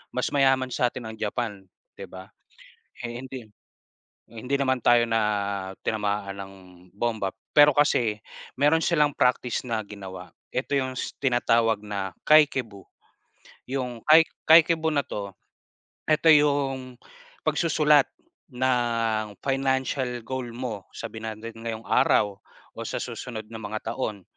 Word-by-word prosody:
mas 125 - 0
mayaman 135 -2 +3
sa 125 0 +1
atin 120 -3 -7
ang - - -10
Japan, 105 -1 -3 0.4
'di - - -6
ba? 95 0 -11 0.7
Eh, 120 -1 -5
hindi 130 -3 -8 0.8
eh, 115 - -14
hindi 135 +4 -1
naman 130 -2 0
tayo 120 0 +5
na 115 0 +2 0.7
tinamaan 100 -2 -2
ng 95 0 -9 0.4
bomba. 110 -3 -1 0.2
Pero 145 0 +8
kasi, 120 -7 +2 0.4
meron 150 +4 +3
silang 150 -4 +3
practice 125 -1 +1
na 110 -2 -1
ginawa, 95 -4 -9 0.2
eto 125 - -3
'yong 130 -1 -2
s - - -4
tinatawag 115 -4 +2
na 100 -2 -4 0.2
Kakeibo. 130 -10 +3 0.8
'Yong 125 -3 -4
Ka 155 +1 +9 0.4
Kakeibo 160 0 0
na 145 - +2
'to, 100 -1 -5 0.8
eto 155 +1 +4
'yong 140 -4 +2 0.5
pagsusulat 150 -2 +3 0.4
ng 115 -4 0
financial 130 -2 -1
goal 130 +1 -4
mo, 115 -6 -5
sabihin 110 -1 -6
na 110 - -6
natin 115 0 -9
ngayong 115 -1 -5
araw, 100 -1 +3 0.4
o - - -10
sa - - -4
susunod 110 -3 -6
na 115 - -7
mga 110 +1 -4
taon. 110 -6 -4
120 Hz, 135 wpm, -25 LUFS, 110-135 Hz, 0.8 s, Ka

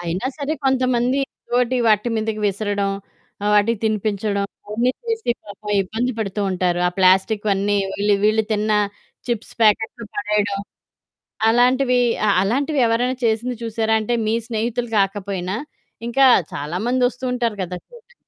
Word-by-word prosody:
అయినా 175 +6 -3
సరే 290 +1 -2
కొంతమంది, 255 -1 +2 0.3
ఏదోటి 250 +1 +1
వాటి 215 +2 +3
మీదకి 220 0 -2
విసరడం, 200 0 -1 0.5
ఆహ్, 210 - +1
వాటికి 210 +1 +3
తినిపించడం 210 -1 0 0.2
అవన్నీ 230 +4 +1 0.2
చేసి 450 - -1
పాపం 210 0 -8
ఇబ్బంది 225 +7 -2
పడుతూ 210 -1 -2
ఉంటారు. 180 -1 0
ఆ - - -2
ప్లాస్టిక్‌వన్నీ 200 +2 +3 0.2
వీళ్ళు 205 0 +2
వీళ్ళు 215 +1 +3
తిన్న 215 0 0 0.6
చిప్స్ 230 -2 -3
ప్యాకెట్లు 220 +2 +2
పడేయడం. 205 -1 0 0.9
అలాంటివి 250 +2 +3 0.3
అ - - +3
అలాంటివి 275 +8 0
ఎవరైనా 245 +3 +1
చేసింది 230 +2 0
చూసారా 225 -1 0
అంటే 220 +3 -1
మీ 220 - +1
స్నేహితులు 235 +1 -2
కాకపోయినా, 195 -1 -1 0.5
ఇంకా 270 +3 +4 0.3
చాలా 150 +4 -4
మంది 250 +1 +1
వస్తూ 250 +1 -9
ఉంటారు 235 -4 -1
కదా! 180 0 -4
ఆ - - -53
చోటకు. 480 0 -17
220 Hz, 140 wpm, -21 LUFS, 200-245 Hz, 0.9 s, ఇంకా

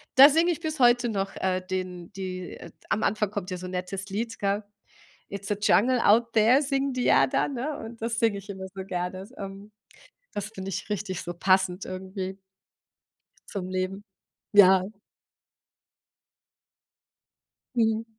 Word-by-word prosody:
Da 275 +2 +10
singe 330 +4 +3
ich 335 - -3
bis 315 -2 -3
heute 240 -1 +5
noch, 195 -2 -2
äh, 185 -1 0
den 185 -1 -4
die, 185 -1 -5
äh - - -11 0.2
am 220 - 0
Anfang 210 -1 +1
kommt 200 -3 -4
ja 185 - -2
so 185 - -7
nettes 185 +2 -4
Lied, 225 +3 -3
gell? 200 +1 0 0.7
"Its 200 +1 -6
a 205 - +2
jungle 245 +5 +4
out 230 +3 +4
there" 230 +6 +5
singen 275 -1 0
die 250 - -1
ja - - +5
dann, - - 0
ne? 285 +5 -3
Und 225 0 -9
das 230 0 -2
singe 225 -3 +2
ich 200 +1 -15
immer 190 -1 -6
so 190 -1 -6
gerne. 180 +1 -4
Ähm, 195 +1 -8 0.6
das 205 0 -3
finde 190 -2 -6
ich 195 - -5
richtig 200 -3 -3
so 175 - -5
passend 185 +1 +2
irgendwie. 190 +1 -5 1.1
Zum 185 -3 -4
Leben. 185 +2 -3 0.5
Ja. 190 -2 +7 2.9
Mhm. 225 -1 +2
200 Hz, 155 wpm, -27 LUFS, 185-230 Hz, 2.9 s, Da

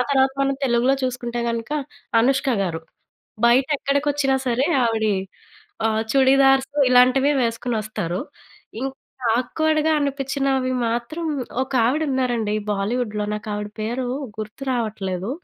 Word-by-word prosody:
ఆ - - +2
తర్వాత 265 -1 +4
మనం 275 0 +2
తెలుగులో 245 +1 +3
చూసుకుంటే 240 -2 -2
కనుక 230 +2 -3 0.5
అనుష్కగారు. 230 - +1 0.7
బయట 250 +3 +4
ఎక్కడికి 280 +2 0
వచ్చినా 270 -2 +1
సరే 250 +3 +1 0.2
ఆవిడీ 220 -2 +1 0.7
ఆహ్, 220 0 +1
చుడీదార్సు 270 +1 +4
ఇలాంటివి 255 +3 +5
వేసుకొని 230 0 -1
వస్తారు. 180 -4 -3 0.6
ఇంక 270 +1 -2 0.5
ఆక్వర్డ్‌గా 315 +4 +1
అనిపించినవి 275 -2 0 0.2
మాత్రం 240 +9 -3 0.4
ఒక 265 - -12
ఆవిడ 290 +6 +1
ఉన్నారండి 240 -5 0 0.2
బాలీవుడ్‌లో 210 +1 -1
నాకు 210 +1 -6
ఆవిడ 210 0 -4
పేరు 245 +3 -2 0.3
గుర్తు 215 +5 -6
రావట్లేదు. 205 -3 -2
250 Hz, 115 wpm, -22 LUFS, 225-270 Hz, 0.7 s, ఇలాంటివి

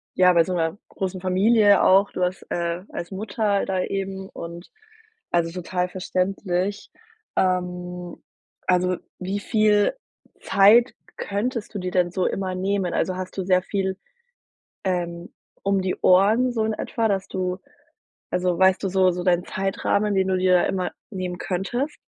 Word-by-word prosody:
ja, 180 0 +5
bei 170 -1 +5
so 185 - -3
'ner 165 0 -1
großen 185 -1 -4
Familie 205 +2 +4
auch. 195 +2 +5
Du 185 - -2
hast, 180 +1 -2
äh, 170 +1 -2
als 175 - -6
Mutter 205 0 -1
da 190 -1 -1
eben 195 0 -4
und 170 +1 -9 0.6
also, 170 -1 +1
total 180 +1 -2
verständlich. 185 +1 -2 0.4
Ähm, 180 -1 -2 0.5
also, 180 0 +2 0.2
wie 190 +2 -3
viel 210 -1 +3 0.5
Zeit 210 +5 +5 0.2
könntest 215 +2 -3
du - - -2
dir 180 0 -3
denn 180 -1 +1
so 185 0 -1
immer 190 -1 -2
nehmen? 190 -1 -1
Also, 185 - 0
hast 185 +1 -6
du 190 - -1
sehr 185 -1 +3
viel, 190 0 -2 0.9
ähm, 175 -2 -3 0.3
um 195 -1 +1
die 185 0 -1
Ohren 215 +7 +4
so 225 -2 0
in 220 - 0
etwa, 225 +1 -1
dass 195 -2 -1
du 185 -1 -2 0.7
also, 180 -1 0
weißt 190 0 +4
du 195 - 0
so 185 0 +3
so 180 0 -4
deinen 175 -1 +2
Zeitrahmen, 200 +2 0
den 190 0 +2
du 185 - +2
dir 185 -1 +4
immer 185 -2 -2 0.2
nehmen 185 -3 -4
könntest? 240 - -3
185 Hz, 155 wpm, -23 LUFS, 180-200 Hz, 0.9 s, ja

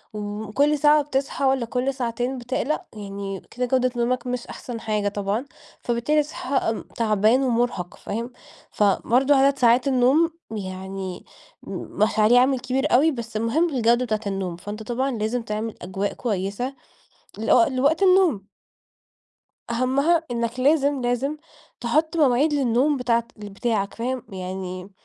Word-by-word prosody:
وكل 215 +8 0
ساعة 300 +1 +5
بتصحى 275 -1 -2
والّا 265 -2 +2
كل 250 +3 -1
ساعتين 245 0 -2
بتقلق، 255 +4 -2
يعني 200 -2 -6
كده 250 +1 -2
جودة 255 0 +1
نومك 245 +1 -1
مش 250 -1 -3
أحسن 235 -2 -7
حاجة 215 -2 -1
طبعًا، 205 +5 -2 0.4
فبالتالي 245 +6 +1
هتصحى 265 -6 -2
تعبان 220 +3 +3
ومرهق، 235 -8 -1
فاهم؟ 230 +4 -5 0.4
فبرضه 245 +7 +3
عدد 275 +1 +4
ساعات 245 +2 +4
النوم 275 +6 +3 0.2
يعني 190 -2 -6 0.4
م - - -9 0.3
مش 220 0 +1
عليه 230 +4 +6
عامل 260 0 +3
كبير 260 +3 -1
أوي 305 +6 +5
بس 230 -4 -5
المهم 295 +10 +1
الجودة 240 -2 +2
بتاعة 215 -1 -1
النوم، 195 -3 -3
فأنت 205 +4 -7
طبعًا 260 +4 -1
لازم 230 +1 -1
تعمل 220 0 -4
أجواء 195 +3 -3
كويسة 210 +4 -3 0.7
لو 225 +9 +4
لوقت 285 +4 +1
النوم. 365 - +4 1.2
أهمّها 275 +8 +2
إنك 235 +1 -2
لازم، 285 0 +3
لازم 250 +5 -1 0.4
تحُط 310 +7 +1
مواعيد 285 0 +3
للنوم 270 +2 +2
بتاعة 235 -2 +1
بتاعك 205 0 -2
فاهم؟ 250 +1 -3
يعني 185 0 -6
245 Hz, 135 wpm, -23 LUFS, 215-270 Hz, 1.2 s, عليه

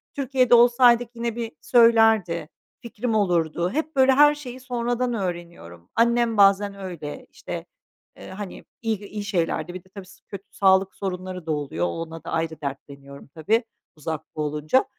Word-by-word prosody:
Türkiye'de 260 -3 +3
olsaydık 240 0 +5
yine 235 -1 -3
bir 230 -1 -4
söylerdi, 225 -9 +4 0.3
fikrim 235 -1 -3
olurdu, 175 -4 +1
hep 310 +1 -3
böyle 265 0 +5
her 295 +2 +6
şeyi 260 -4 -9
sonradan 245 0 -2
öğreniyorum. 170 - -6
Annem 235 -1 +2
bazen 200 0 +4
öyle, 170 -6 -7
işte, - - -7 0.5
eee, - - -11
hani 190 0 -8 0.2
iyi 225 -3 -1
iyi 210 0 -6
şeylerde 175 -3 -1
bir 185 -1 -8
de 190 - -25
tabii, 195 0 -10
s 185 - -18
kötü 200 -1 -8
sağlık 190 -1 +3
sorunları 185 -2 -5
da 160 - -2
oluyor, 140 - -2
o - - -1
ona 165 - -6
da - - -7
ayrı 165 -1 -2
dertleniyorum 140 0 -8
tabii 165 - 0 0.3
uzakta 155 0 -6
olunca 150 - +1
195 Hz, 155 wpm, -24 LUFS, 165-235 Hz, 0.5 s, her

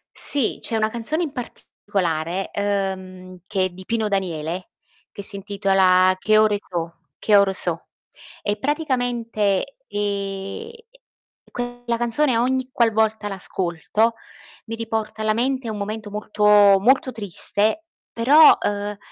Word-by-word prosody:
Sì, 280 -5 +3
c'è 230 - -2
una 215 0 +1
canzone 240 +9 -2
in 300 - -4
particolare, 185 - -3
ehm, 190 -2 -3
che 190 -2 0
è - - -2
di 185 +1 -12
Pino 225 -2 0
Daniele, 180 -3 -3 0.4
che 200 - -8
si 200 - 0
intitola 195 -2 +3
"Che 215 +2 +3
ore 215 -1 +4
so'", 170 -4 -5 0.3
"Che 210 - +3
ore 200 -1 +3
so'", 170 -3 -2 0.5
e 205 0 -1
praticamente, 245 -5 -1
ehm, 200 - -4 0.8
quella 245 -1 -4
canzone 240 +2 +1
ogni 255 +2 0
qualvolta 220 -3 +1
l'ascolto, 195 +3 -1 0.5
mi 225 0 -5
riporta 225 -1 -4
alla 215 0 +1
mente 255 0 -1
un 215 - -4
momento 210 +1 -5
molto, 210 0 -4 0.4
molto 255 +5 +3
triste, 215 - -2 0.3
però, 285 +7 +6
ehm, 205 0 -3
210 Hz, 125 wpm, -22 LUFS, 195-235 Hz, 0.8 s, però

